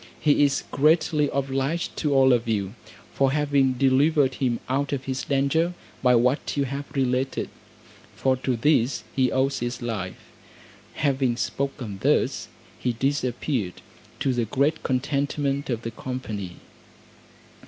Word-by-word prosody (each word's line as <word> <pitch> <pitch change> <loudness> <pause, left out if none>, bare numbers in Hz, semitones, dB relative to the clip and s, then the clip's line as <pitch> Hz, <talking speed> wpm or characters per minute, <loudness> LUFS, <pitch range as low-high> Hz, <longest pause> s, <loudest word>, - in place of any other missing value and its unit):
He 145 -1 +4
is 140 -1 +2
greatly 150 0 +3
obliged 135 +4 -1
to 150 - 0
all 135 -1 +5
of 120 -1 0
you, 100 -3 -1 0.4
for 135 -1 +2
having 140 -3 +2
delivered 135 +2 +3
him 125 -2 -1
out 140 +2 0
of 135 -2 -2
his 130 0 -3
danger 155 +6 +1 0.3
by 125 -1 +5
what 125 +5 +1
you 140 - +3
have 140 +2 -5
related, 130 0 0 0.6
for 130 -1 +2
to 130 0 -1
this 130 0 +2
he 130 -2 +2
owes 135 +1 +1
his 120 0 -3
life." 110 -6 -5 0.6
Having 135 -5 +1
spoken 125 -8 -3
thus - - +1 0.3
he 125 - 0
disappeared, 125 - -1 0.4
to 135 - +2
the 120 -2 0
great 140 +8 +1
contentment 140 +1 -1
of 120 -2 -2
the 115 - -4
company. 110 -7 -5
135 Hz, 135 wpm, -25 LUFS, 125-140 Hz, 0.6 s, all